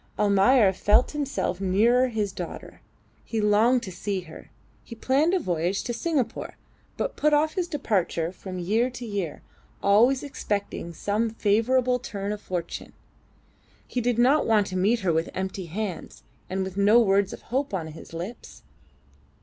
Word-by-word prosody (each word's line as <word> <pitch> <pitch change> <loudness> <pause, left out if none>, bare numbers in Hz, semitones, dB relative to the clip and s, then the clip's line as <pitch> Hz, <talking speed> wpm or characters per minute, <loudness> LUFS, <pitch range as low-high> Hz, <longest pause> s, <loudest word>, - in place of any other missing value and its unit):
Almayer 205 +1 +4
felt 210 +6 +3
himself 260 -11 -2
nearer 230 +7 +3
his 215 -4 -2
daughter. 180 -2 -8 0.4
He 225 - -3
longed 220 +4 +3
to 190 - -6
see 195 +1 -3
her, 160 -3 -13 0.4
and 230 -2 -9
planned 295 +10 +2
a - - +2
voyage 175 - -1
to 240 - -3
Singapore, 290 -2 -2 0.4
but - - -2
put 300 0 +3
off 310 +1 +2
his 365 -3 -1
departure 185 - -1
from 185 0 -8
year 215 +8 +1
to 245 -1 -8
year, 200 -8 -4 0.4
always 235 +7 +4
expecting 205 -10 -4
some 210 +6 -1
favourable 240 +4 +2
turn 200 -4 -5
of 210 0 -5
fortune. 175 -2 -5 0.9
He 250 - -2
did 240 -1 0
not 265 +6 +4
want 215 -3 +4
to 185 - -6
meet 210 +6 +2
her 180 -4 +1
with 160 +1 0
empty 190 -1 -4
hands 190 +1 -5 0.3
and 190 +1 -1
with 190 0 -6
no 205 +4 +6
words 200 -3 +3
of - - -9
hope 275 +2 0
on 185 -5 -2
his 160 0 -11
lips. 180 +8 -8
210 Hz, 160 wpm, -26 LUFS, 190-245 Hz, 0.9 s, no